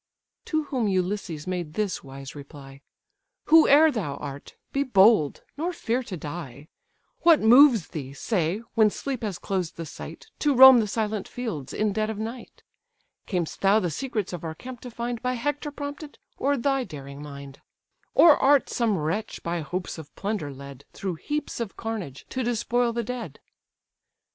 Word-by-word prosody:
To 315 -1 0
whom 255 -6 -1
Ulysses 185 -4 -2
made 175 -4 -4
this 210 -3 -2
wise 135 0 -9
reply: 140 -1 -12 0.7
"Whoe'er 315 -1 +7
thou 185 - -3
art, 140 0 -8 0.2
be 275 - +1
bold, 205 - +4
nor 335 +4 -1
fear 245 -7 -1
to 205 -7 -7
die. 150 -2 -8 0.5
What 335 -2 +6
moves 240 - +6
thee, 135 -4 -6
say, 180 - -1
when 220 -2 +5
sleep 265 +3 -4
has 205 -6 -3
closed 185 -4 -3
the 165 - -5
sight, 445 - -10
To 290 -2 +2
roam 260 0 +10
the 215 - 0
silent 215 -1 -2
fields 220 - -5
in 210 -1 0
dead 215 +1 -1
of 220 - -4
night? 225 +3 -7 0.6
Cam'st 175 -4 -3
thou 200 +2 +5
the 175 -5 -2
secrets 215 - -3
of 175 - -6
our 160 -1 -5
camp 250 +5 -9
to 250 - -8
find, 235 0 -4
By 250 0 -1
Hector 290 +4 -2
prompted, 290 +1 -7 0.2
or 280 +1 0
thy 270 +1 +1
daring 140 - -9
mind? 140 -2 -10 0.5
Or 325 -4 +8
art 280 0 +3
some 225 -5 +1
wretch 165 +8 -3
by 170 0 -2
hopes 180 +3 -5
of 155 - -12
plunder 200 -8 -3
led, 140 0 -11
Through 185 -4 -4
heaps 295 -3 -3
of 230 -4 -5
carnage, 210 - -5
to 260 - -3
despoil 240 +1 0
the 235 0 -2
dead?" 230 - -6
215 Hz, 170 wpm, -26 LUFS, 160-250 Hz, 0.7 s, roam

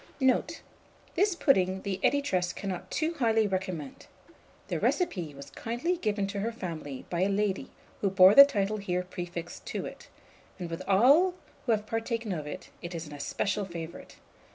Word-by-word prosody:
Note. 260 -2 +1 0.5
This 390 +1 +2
pudding 190 - +2
the 195 -2 -2
editress 185 -11 +1
cannot 190 -3 -5
too 325 +1 0
highly 225 -3 +3
recommend. 185 -7 -4 0.6
The - - -2
recipe 175 - 0
was 140 0 -10
kindly 240 +11 -2
given 210 - -1
to 200 0 -3
her 225 +4 -1
family 160 - -6
by 175 0 0
a 190 - +3
lady 200 -1 0 0.3
who 200 - +1
bore 190 0 +7
the 280 - +12
title 215 -6 0
here 180 -3 -1
prefixed 175 -1 -6
to - - -3
it; - - -9 0.5
and 175 -3 -6
with 165 - -4
all 280 - +5 0.3
who - - +3
have 210 -1 -1
partaken 225 0 -2
of 155 -5 -3
it, 150 - -8
it 170 0 -6
is 165 0 -4
an 150 - -10
especial 195 +7 -1
favourite. 170 -3 -8
195 Hz, 170 wpm, -29 LUFS, 175-230 Hz, 0.6 s, the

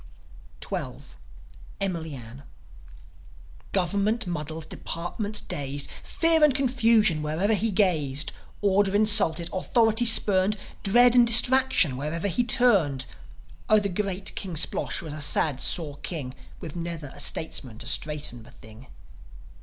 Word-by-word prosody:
XII. - - -5 0.9
EMILY 170 -6 -4
ANN 120 +2 -12 1.3
Government 200 +5 -1
muddles, 160 -2 -6
departments 205 +8 -6
dazed, 140 0 -5
Fear 325 -1 0
and 295 -4 +3
confusion 230 - +2
wherever 160 +8 -2
he 220 +2 -1
gazed; 155 -8 -1 0.3
Order 200 0 +1
insulted, 205 -6 +5
authority 225 +4 0
spurned, 210 -2 +4 0.2
Dread 240 +4 +3
and 245 -1 +4
distraction 240 - +6
wherever 155 +7 -4
he 225 +6 -1
turned 195 - +2 0.6
Oh, 215 - +5
the 205 -1 0
great 195 0 -4
King 185 -4 -6
Splosh 155 - -1
was 155 -3 -8
a 155 - -8
sad, 140 -1 -1
sore 150 -4 +1
king, 145 -4 -6 0.3
With 160 -1 -10
never 165 -4 -7
a - - -14
statesman 130 -7 -2
to 120 - -10
straighten 145 -3 0
the 110 - -17
thing. 110 +4 -16
180 Hz, 125 wpm, -24 LUFS, 150-215 Hz, 1.3 s, distraction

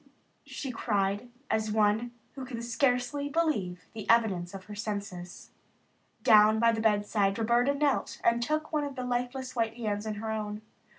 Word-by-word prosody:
she 270 - -5
cried 205 -1 -1 0.2
as 220 -1 0
one 215 +2 +2 0.2
who 270 - -8
can 250 -2 -6
scarcely 250 +4 0
believe 240 - -1
the 220 -2 -8
evidence 195 -7 +3
of 190 - -8
her 210 - -10
senses. 200 -4 -6 0.7
Down 215 -2 +7
by 230 +1 +4
the 225 -1 -2
bedside 205 -2 +2
Roberta 240 +5 +2
knelt 285 -1 0
and 235 0 +3
took 310 +5 -1
one 300 -1 +1
of 285 -2 -5
the 255 -2 -4
lifeless 250 +1 -3
white 225 -1 0
hands 215 -2 -3
in 215 - -2
her 220 +1 -4
own. 210 -1 -4
225 Hz, 165 wpm, -29 LUFS, 210-250 Hz, 0.7 s, Down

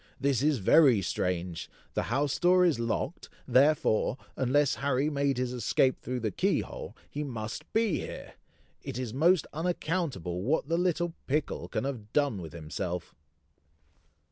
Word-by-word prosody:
"This 135 -3 +1
is 150 -1 +3
very 120 - +5
strange! 90 -2 -2 0.2
The - - 0
house 140 +3 0
door 180 +1 +5
is 160 -9 +2
locked, 115 +7 -2 0.2
therefore, 130 -2 +3 0.2
unless 135 +2 +2
Harry 140 +2 +1
made 140 -2 +1
his 125 0 -1
escape 125 +2 +2
through 125 0 -3
the 110 -2 -1
key - - +1
hole, - - -8
he 150 - -4
must 110 -6 -6
be 220 -6 +2
here! - - -7 0.5
It - - -6
is 125 -4 -4
most 165 +5 +4
unaccountable 155 - -2
what 140 +8 0
the 165 +1 +1
little 175 -1 0
pickle 145 +2 -1
can - - -2
have 120 -6 -5
done 140 -10 +1
with 80 -2 -8
himself!" 85 +2 -5
135 Hz, 150 wpm, -29 LUFS, 110-155 Hz, 0.5 s, very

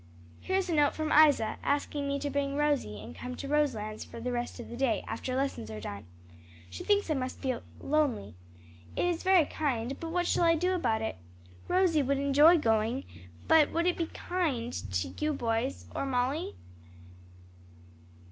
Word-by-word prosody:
"Here's 380 0 -1
a 345 - -1
note 295 -2 +3
from 310 -1 -2
Isa, 290 -7 +5
asking 285 0 -1
me 280 0 0
to 285 - -2
bring 280 0 -1
Rosie 285 - 0
and 115 +3 -10
come 250 0 -6
to 275 - -6
Roselands 245 -8 0
for - - -10
the 250 +2 -3
rest 240 +1 -3
of 240 - -7
the 235 - -8
day, 250 -2 0
after 255 +3 -3
lessons 265 - -2
are 110 -1 -6
done. 100 -1 -7 0.6
She - - -7
thinks 410 -5 +2
I - - +4
must 255 -2 -3
feel 255 -3 -2 0.2
lonely. 280 - 0 0.6
It - - +1
is 350 -2 0
very 375 -4 +5
kind, 270 -4 -2
but 330 - -5
what 350 +1 0
shall 345 - +2
I 330 0 +5
do 360 +3 +1
about 225 -11 0
it? 220 - -3 0.5
Rosie 360 -4 +3
would 275 +1 +1
enjoy 285 +5 +6
going, 225 0 +1 0.4
but 315 -2 +5
would 335 +1 +1
it 360 - +2
be 335 - -2
kind 290 -13 -2
to 90 -3 -2
you 305 - +1
or - - 0
the - - -5
boys, 230 +2 -1
or 275 - -1
Molly?" 250 - -1
280 Hz, 185 wpm, -30 LUFS, 235-315 Hz, 0.6 s, enjoy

